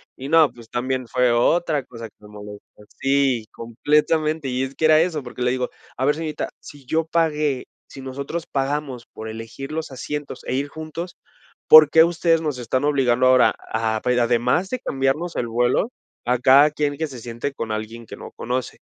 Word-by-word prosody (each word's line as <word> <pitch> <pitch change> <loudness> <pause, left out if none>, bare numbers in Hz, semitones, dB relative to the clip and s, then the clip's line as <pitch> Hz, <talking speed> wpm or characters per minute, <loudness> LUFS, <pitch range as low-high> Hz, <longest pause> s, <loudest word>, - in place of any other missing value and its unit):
y 135 +2 -7
no, 160 -2 +5
pues, 115 -2 -15
también 130 0 -2
fue 125 +1 +2
otra 150 +3 +2
cosa 115 -2 -10
que - - -48
me 105 - -15
molestó, 105 0 -10 0.3
sí, 135 -4 +1
completamente, 150 +5 0
y 125 +1 -1
es 135 +1 -6
que 160 - 0
era 155 0 +6
eso, 165 -4 -1
porque 125 0 -9
le 125 - +2
digo: 125 -1 -2 0.3
"A 130 - 0
ver, 145 +1 +3
señorita, 155 -1 -4
si 145 -3 -14
yo 160 +4 0
pagué 150 -5 0 0.2
si 135 - -10
nosotros 140 +5 -5
pagamos 135 -2 -2
por 110 0 -7
elegir 115 +6 -8
los 160 -2 -4
asientos 145 +3 -6
e - - -3
ir 140 +2 -1
juntos, 160 +3 -7 0.5
¿por 155 -2 +10
qué 160 +2 +6
ustedes 170 -1 +2
nos 150 -5 -2
están 130 +3 -1
obligando 130 -3 +2
ahora 130 0 +5 0.2
a 110 -1 0
pa 125 - -1
además 125 +8 +1
de 255 - -3
cambiarnos 140 - -1
el 120 - -1
vuelo, 120 - +1 0.3
a 125 +1 +2
cada 135 +4 +6
quien 145 -1 -2
que 160 - -2
se 130 -3 -9
siente 120 +4 -5
con 115 -5 -5
alguien 110 +2 -5
que - - -10
no - - -10
conoce", 125 +1 -4
135 Hz, 195 wpm, -22 LUFS, 120-155 Hz, 0.5 s, por